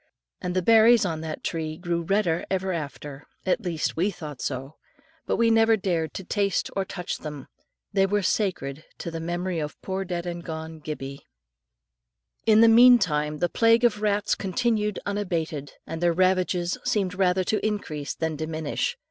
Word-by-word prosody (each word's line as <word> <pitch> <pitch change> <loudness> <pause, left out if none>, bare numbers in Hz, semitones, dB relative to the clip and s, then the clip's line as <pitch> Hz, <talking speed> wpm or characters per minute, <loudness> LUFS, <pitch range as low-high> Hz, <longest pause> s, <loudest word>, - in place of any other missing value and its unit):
And 180 0 -3
the 185 - +1
berries 225 +1 +6
on 160 -3 -2
that 160 -1 -6
tree 155 -2 -3
grew 170 -1 -2
redder 175 -2 +1
ever 190 0 -1
after, 145 -2 -6 0.2
at 190 +4 +1
least 170 -6 -2
we 180 +5 +1
thought 150 -7 -8
so; 135 +5 -4 0.5
but - - +1
we 230 0 +3
never 225 0 +5
dared 170 -6 -1
to 190 - -5
taste 200 0 0
or 195 - +1
touch 180 -2 -5
them, 150 -3 -7 0.5
they 195 -1 +3
were 205 +1 0
sacred 155 -9 -1
to 170 - -5
the 165 - -4
memory 175 +1 -2
of 150 -1 -5
poor 190 0 -2
dead 175 -2 -4
and 170 -1 -5
gone 160 0 -6
Gibbie. 140 -2 -7 1.2
In 220 0 +6
the 230 - +8
meantime 195 -11 +5
the 175 - +1
plague 230 +4 +3
of 210 -3 +2
rats 205 -1 +1
continued 210 0 0
unabated, 165 -8 -3
and 165 0 -6
their 175 -1 +3
ravages 185 -1 +1
seemed 195 -4 0
rather 185 0 +2
to 215 +4 -1
increase 160 -9 -3
than 160 -1 -2
diminish. 160 - -2
180 Hz, 170 wpm, -25 LUFS, 160-205 Hz, 1.2 s, the